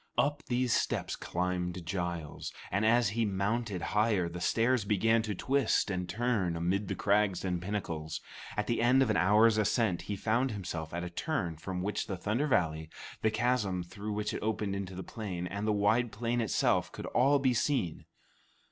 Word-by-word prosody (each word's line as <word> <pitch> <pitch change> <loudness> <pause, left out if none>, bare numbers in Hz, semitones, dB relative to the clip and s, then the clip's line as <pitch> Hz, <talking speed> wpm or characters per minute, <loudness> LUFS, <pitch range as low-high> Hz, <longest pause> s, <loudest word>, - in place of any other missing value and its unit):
Up 145 +1 +2
these 125 -1 +1
steps - - 0
climbed 90 0 -2
Giles, 85 -3 -3 0.2
and 100 +3 +1
as 120 -2 +4
he 115 +3 0
mounted 100 0 -1
higher, 105 -4 +2
the 85 +1 -6
stairs 115 +4 +2
began 110 +3 +3
to 110 -2 -3
twist 130 -3 +1
and 90 -1 -3
turn 105 -4 0
amid 95 +4 0
the - - -2
crags 100 -2 +1
and 90 -2 -1
pinnacles. 85 -5 -3 0.4
At 105 - +1
the 115 - 0
end 130 +3 +5
of 115 - +1
an - - +1
hour's 105 +4 +5
ascent, 105 -3 +1
he 105 - -4
found 115 +6 +1
himself 85 -7 -5
at 85 +1 -3
a 90 - -5
turn 90 - -2
from 90 +3 -4
which 105 +2 -2
the 95 - -3
Thunder 110 - 0
Valley, 80 - +1 0.3
the 110 - +3
chasm 110 -5 0
through 105 +4 -6
which 105 0 -2
it - - -2
opened 105 -2 -1
into 95 -1 -5
the 95 - -5
plain, 95 -6 -5
and 100 +4 -3
the - - +3
wide 110 +3 +2
plain 120 +3 -1
itself, 110 - +1
could - - -7
all 135 +4 +3
be 135 -2 +2
seen. 120 - 0
105 Hz, 185 wpm, -31 LUFS, 90-115 Hz, 0.4 s, end